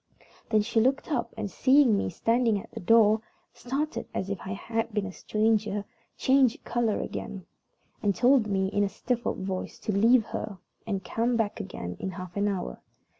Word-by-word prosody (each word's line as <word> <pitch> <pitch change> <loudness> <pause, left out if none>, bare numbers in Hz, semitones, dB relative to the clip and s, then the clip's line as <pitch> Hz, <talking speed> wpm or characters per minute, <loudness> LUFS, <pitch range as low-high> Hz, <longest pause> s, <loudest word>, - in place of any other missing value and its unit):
Then 215 -2 +3
she 225 +1 +1
looked 265 +7 +1
up, 240 -5 -1
and, 210 -3 -3
seeing 265 -4 +5
me 200 - 0
standing 230 +3 +1
at - - -12
the - - -7
door, 220 +2 +5 0.3
started 280 +5 -3
as 195 +1 -2
if 200 - -3
I 190 - -4
had 225 +3 -3
been 210 -1 -1
a 195 - -5
stranger, 215 0 0 0.3
changed 265 +1 +3
color 235 -3 0
again, 200 -5 -5 0.6
and 200 -3 +1
told 245 -1 +4
me, 190 -2 +1
in 205 0 +1
a 200 - +1
stifled 240 +1 -2
voice, 190 -1 -4
to - - -3
leave 225 +3 +4
her 210 -3 -5 0.3
and 195 -3 -2
come 235 +4 0
back 220 -2 -1
again 90 - -6
in - - -3
half 185 -1 -8
an 205 0 +1
hour. 195 -3 -3
215 Hz, 180 wpm, -28 LUFS, 200-235 Hz, 0.6 s, seeing